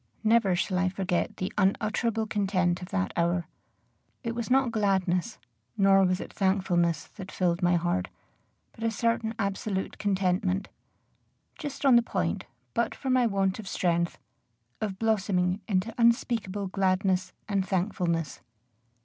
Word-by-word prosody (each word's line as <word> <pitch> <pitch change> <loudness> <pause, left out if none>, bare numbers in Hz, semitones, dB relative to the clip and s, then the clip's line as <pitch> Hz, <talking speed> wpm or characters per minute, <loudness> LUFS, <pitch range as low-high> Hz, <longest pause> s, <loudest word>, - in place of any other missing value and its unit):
Never 220 -4 +4
shall 185 +1 0
I 185 0 +2
forget 185 -2 -1
the 185 - -3
unutterable 220 +3 +1
content 190 -4 0
of 180 - -7
that 95 0 -1
hour. 170 0 +1 0.8
It 230 -1 -2
was 235 0 -4
not 260 -1 +3
gladness, 195 -1 0 0.4
nor 195 -1 +5
was 185 0 +2
it - - -8
thankfulness, 185 -4 +1
that 190 -2 -8
filled 175 -1 0
my 175 0 +3
heart, 165 - 0 0.6
but 225 - -10
a 230 - +2
certain 225 0 0
absolute 200 -1 -2
contentment, 190 -1 0 0.9
just 290 -2 -6
on 260 -3 +7
the - - +6
point, 85 - -2 0.3
but 235 -1 0
for 265 - -3
my 255 -2 +4
want 195 -1 0
of 210 - -7
strength, 170 -2 0 0.6
of 200 -3 -2
blossoming 195 -3 +1
into 200 +2 0
unspeakable 230 -4 +2
gladness 185 -1 +1 0.2
and 195 -2 0
thankfulness. 175 -4 -1
195 Hz, 140 wpm, -28 LUFS, 180-220 Hz, 0.9 s, on